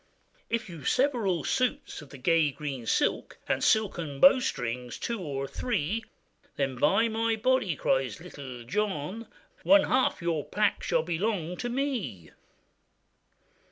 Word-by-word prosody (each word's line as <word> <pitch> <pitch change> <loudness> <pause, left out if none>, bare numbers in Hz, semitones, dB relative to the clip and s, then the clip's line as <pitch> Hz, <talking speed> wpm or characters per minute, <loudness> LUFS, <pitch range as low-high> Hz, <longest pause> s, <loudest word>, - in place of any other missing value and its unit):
'If 230 -1 -1
you 170 -3 -9
have 140 - -1
several 230 - +1
suits 255 -8 -1
of 145 - -13
the 140 - -11
gay 160 +3 +3
green 135 -4 -6
silk, - - 0
And - - 0
silken 170 -10 +1
bowstrings 125 - +3
two 235 -2 -3
or 135 -4 -3
three, 220 - -2 0.5
Then 135 -1 0
it's 125 - -10
by 225 +10 +4
my 225 0 0
body,' 255 +4 +1
cries - - 0
bittle 130 -4 -9
John, 200 - -2 0.3
'One 295 +1 +6
half 260 +1 +2
your 170 -4 -1
pack 210 +1 0
shall 165 -3 +1
belong 175 0 -1
to 245 - -3
me. 240 - -3
180 Hz, 140 wpm, -28 LUFS, 145-230 Hz, 0.5 s, One